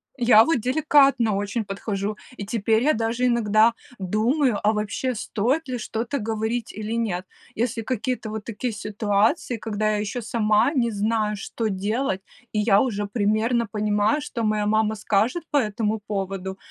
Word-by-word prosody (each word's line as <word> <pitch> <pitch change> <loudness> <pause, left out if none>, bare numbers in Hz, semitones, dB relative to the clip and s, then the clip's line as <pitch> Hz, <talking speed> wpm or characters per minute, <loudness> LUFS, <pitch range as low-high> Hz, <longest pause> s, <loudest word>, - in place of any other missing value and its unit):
Я 240 -4 +6
вот 325 -5 +2
деликатно 275 -4 +3
очень 205 +3 -2
подхожу, 200 +1 -3 0.2
и 200 - -5
теперь 220 +1 +1
я 305 +3 +4
даже 230 +2 -1
иногда 225 -1 +4 0.3
думаю, 220 - +1
а 210 - +4
вообще, 215 +5 -2
стоит 250 +8 -1
ли 255 -1 -3
что-то 230 +4 -3
говорить 225 +1 -2
или 215 +1 -4
нет. 205 -6 -1 0.3
Если 230 0 -1
какие-то 250 0 -3
вот 215 0 -5
такие 230 +1 -3
ситуации, 210 +2 0
когда 215 -1 -1
я 210 - 0
еще 210 +4 -3
сама 220 +2 +2
не 240 -5 +1
знаю, 210 0 0
что 220 +2 -3
делать, 205 +2 -1 0.3
и 215 - -1
я 205 -2 +4
уже 205 -5 -1
примерно 220 +3 +1
понимаю, 210 +6 +1
что 245 -5 -4
моя 215 -1 +1
мама 215 +1 +2
скажет 215 - 0
по 295 - +3
этому 215 -3 0
поводу. 195 -2 -4
220 Hz, 160 wpm, -24 LUFS, 210-235 Hz, 0.3 s, Я